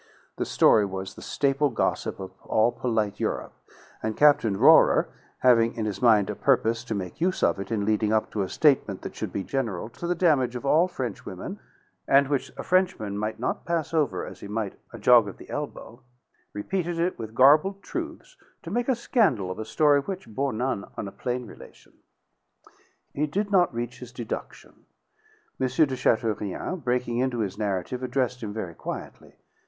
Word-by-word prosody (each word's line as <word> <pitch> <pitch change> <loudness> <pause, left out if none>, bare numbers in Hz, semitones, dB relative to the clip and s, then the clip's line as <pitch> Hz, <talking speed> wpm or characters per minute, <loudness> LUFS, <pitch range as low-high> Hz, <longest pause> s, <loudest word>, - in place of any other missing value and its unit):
The - - -1
story 105 - +5
was 95 -1 -5
the - - -12
staple 140 +1 +1
gossip 120 - -1
of 95 -1 -7
all 110 +2 +2
polite 110 -4 -1
Europe; - - -2 0.5
and 110 -1 -3
Captain 140 -9 +4
Rohrer, - - +5 0.3
having 115 -2 +4
in 110 - -2
his 100 -2 -4
mind 110 -5 +5
a - - -6
purpose 115 -3 +1
to 115 - -3
make 95 - -6
use 185 +2 0
of - - +2
it 100 - -6
in 105 -3 0
leading 110 0 +1
up 110 0 +1
to 105 - -2
a 95 - -2
statement 130 -10 +2
that - - -6
should - - -5
be 100 - -3
general 115 -7 -3
to 170 +8 -7
the 175 - +1
damage 145 -8 +2
of 125 - -5
all 160 +6 +4
Frenchwomen, 125 - -6 0.5
and 140 0 +4
which 140 -2 -1
a - - -5
Frenchman 180 - +1
might 110 +1 -3
not 125 - -2
pass 165 -2 -2
over 140 - 0
as - - -10
he - - -8
might 105 -1 -3 0.2
a 115 - -9
jog 115 0 +6
of 100 - -8
the - - -13
elbow, 120 +3 -6 0.5
repeated 175 - -3
it 175 +2 -1
with 110 -1 -7
garbled 155 - +5
truths 335 +7 -6 0.3
to 165 - -7
make 240 +4 -1
a 260 - +3
scandal 165 - +1
of 95 - -7
a 110 - -4
story 145 +4 +3
which 190 +4 -6
bore 135 +5 -2
none 110 -2 -2
on 100 - -4
a - - -7
plain 125 +2 -3
relation. - - -14 1.2
He 150 +2 0
did 200 +7 -2
not 180 -3 +4
reach 120 +1 -5
his 125 -1 -10
deduction. 120 -2 -7 0.7
M. 130 - +1
de 135 +1 +2
Chateaurien, 110 - -1
breaking 125 -1 0
into 125 -2 0
his 100 0 -4
narrative, 100 +4 -2
addressed 125 -1 -1
him 105 -3 -4
very 100 -6 -5
quietly. - - -8
120 Hz, 185 wpm, -26 LUFS, 105-150 Hz, 1.2 s, jog